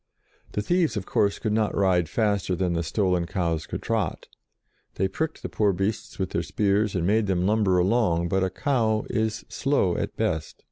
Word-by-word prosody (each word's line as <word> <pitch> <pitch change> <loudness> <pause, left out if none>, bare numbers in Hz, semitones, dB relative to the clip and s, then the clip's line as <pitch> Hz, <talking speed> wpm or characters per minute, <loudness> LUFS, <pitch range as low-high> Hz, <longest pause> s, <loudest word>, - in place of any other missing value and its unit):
The 105 - -1
thieves, 165 - +1
of 95 - -3
course, 100 -1 +1
could 110 - -2
not 110 -1 +1
ride 90 -4 +2
faster 100 -4 0
than 90 -1 0
the 85 - 0
stolen 90 -1 0
cows 85 -5 -1
could - - -5
trot; 110 -7 -1 0.7
they 95 - +1
pricked 160 +10 -4
the - - -2
poor 105 -2 +1
beasts 95 +4 -3
with - - -2
their - - 0
spears, 105 0 0
and 85 -2 0
made 105 +2 +2
them 90 -2 +1
lumber 100 -3 +3
along, 90 -3 +2
but 95 +2 +1
a 95 - +1
cow 110 -1 0
is 110 +1 -1
slow 135 -11 +1
at - - -3
best. 80 -1 -1
100 Hz, 190 wpm, -25 LUFS, 90-110 Hz, 0.7 s, lumber